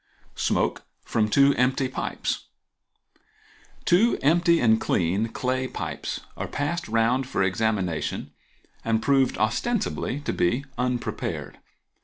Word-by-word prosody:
Smoke - - 0 0.2
from 105 -1 0
Two 140 +5 +5
Empty 130 +1 +2
Pipes.—Two 180 - -3
empty 170 +3 +4
and 110 -2 +4
clean 95 +5 +1
clay 130 +2 -1
pipes - - -5
are - - -4
passed 170 +5 -2
round 115 +4 +2
for 100 - 0
examination 95 -4 -1 0.5
and 115 -1 +1
proved 135 +1 +2
ostensibly 140 - -1
to - - -2
be 120 +11 +1
unprepared. 125 -1 -3
125 Hz, 105 wpm, -25 LUFS, 110-140 Hz, 0.5 s, Two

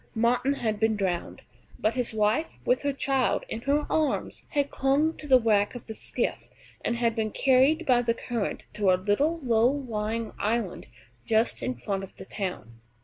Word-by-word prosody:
Martin 240 +4 +2
had 220 -6 -2
been 220 0 +2
drowned, 185 -4 -2 0.3
but 215 - +1
his 250 0 -2
wife, 220 +8 0
with 250 - +2
her 285 - 0
child 270 -2 0
in 225 - -4
her 285 +3 +1
arms, 310 -2 -1
had 285 -2 0
clung 285 +4 +2
to 300 - -10
the 260 -2 +7
wreck 210 -1 +2
of 245 - -8
the 220 - -6
skiff, - - -3 0.3
and 235 - 0
had 235 -1 +1
been 220 -2 0
carried 270 +8 +3
by 250 -3 +4
the 230 -1 0
current 235 -3 -3
to 205 -2 +1
a 185 - +5
little 245 - +1
low 235 -1 +4
lying 230 -5 -3
island 215 -2 -1 0.4
just 225 +1 +1
in 125 - -2
front 195 +11 -3
of 195 - -10
the - - -10
town. 150 - -6
230 Hz, 185 wpm, -27 LUFS, 210-270 Hz, 0.4 s, the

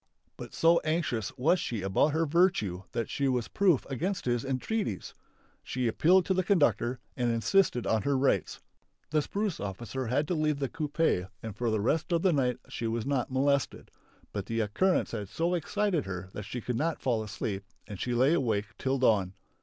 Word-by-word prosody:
But - - -9
so 165 +1 +5
anxious 155 - -1
was 165 +8 +3
she 115 -9 -3
about 95 +9 +3
her 160 +2 +1
virtue 145 - +2
that 115 - -2
she 140 - -1
was 125 -3 0
proof 185 -9 +2
against 180 +8 -2
his 120 -2 0
entreaties. 135 - -2 0.5
She 125 -1 -2
appealed 175 +10 +4
to 190 - +1
the 185 0 +1
conductor 145 - +2 0.2
and 120 -2 0
insisted 125 - +2
on 110 -1 +2
her 140 +5 +1
rights. 130 - +1 0.5
The 155 -1 +3
spruce 200 +3 -2
officer 115 +6 -4
had 140 +5 +1
to - - +1
leave 155 -2 +1
the 135 -2 -2
coupé 150 - 0
and 110 -3 -6
for 120 +2 -1
the 110 -2 0
rest 160 - 0
of 170 -1 +2
the 185 -3 +4
night 125 -4 +1
she 115 - -4
was 115 0 -2
not 135 -3 0
molested. 140 +1 0 0.4
But - - -4
the 115 0 0
occurrence 175 - +1
had 100 -2 -5
so 170 +8 0
excited 180 - 0
her 95 0 -6
that 105 - -6
she 120 +3 -5
could 120 +1 -2
not 160 +4 -1
fall 120 -4 +1
asleep 100 -2 -4 0.2
and 100 -3 -8
she 120 0 -1
lay 130 +6 +4
awake 110 -9 0
till 135 +1 0
dawn. 100 -7 +2
130 Hz, 195 wpm, -29 LUFS, 110-165 Hz, 0.5 s, so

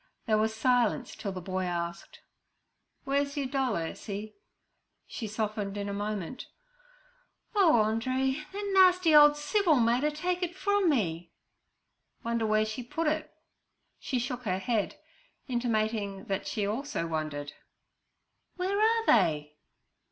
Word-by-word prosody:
There 215 -2 +2
was 220 0 0
silence 245 +1 +1
till 200 - -4
the 185 -1 -6
boy 185 +1 -3
asked: 170 -1 -5 0.8
'Where's 280 +1 -1
your 280 - 0
doll, 265 -2 0
Ursie?' 200 +5 -5 0.7
She 225 - -6
softened 210 -1 -3
in 200 0 -3
a 200 - -3
moment. 205 +2 -4 1.1
'Oh, 345 - +5
Andree, 260 +6 0
that 405 0 -4
nasty 365 -3 +5
ole 295 0 +8
Civil 310 +3 +2
made 240 +1 +2
er 300 - +3
take 355 +4 -2
it 355 0 -2
from 405 -1 +2
me.' 175 - 0 0.9
'Wonder 230 -1 0
where 215 0 +3
she 215 +3 -5
put 325 +7 -3
it.' 310 0 -1 0.7
She 260 - -2
shook 250 0 -3
her 185 -3 0
head, 210 +2 -1 0.5
intimating 220 -5 -1
that 195 -1 -3
she 210 - -1
also 220 -3 -2
wondered. 155 -3 -4 1.0
'Where 385 +3 -1
are 450 +1 +3
they?' 150 - +2
235 Hz, 135 wpm, -29 LUFS, 200-295 Hz, 1.1 s, ole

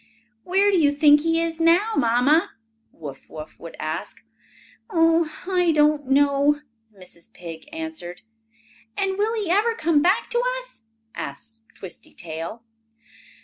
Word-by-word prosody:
"Where 390 +3 +3
do 380 - +3
you 290 -3 +4
think 295 0 +5
he 330 +1 +1
is 330 -1 -2
now, 345 +7 +4
Mamma?" 280 +10 +2 0.4
Wuff 140 -4 -10
Wuff 155 0 -10
would 165 - -10
ask. 155 +1 -5 0.6
"Oh, 330 -3 +3 0.2
I 360 -3 +2
don't 300 -2 +2
know," 285 +1 +3 0.3
Mrs. 185 0 -11
Pig 165 -2 -9
answered. 320 - -7 0.7
"And 385 0 -1
will 440 +2 +1
he 390 -5 -2
ever 440 +5 +2
come 315 -6 +2
back 370 +6 +2
to 480 0 +1 0.2
us?" - - -12 0.3
asked 225 +11 -7
Twisty 185 -3 -10
Tail. 165 +7 -7
300 Hz, 135 wpm, -23 LUFS, 225-355 Hz, 0.7 s, think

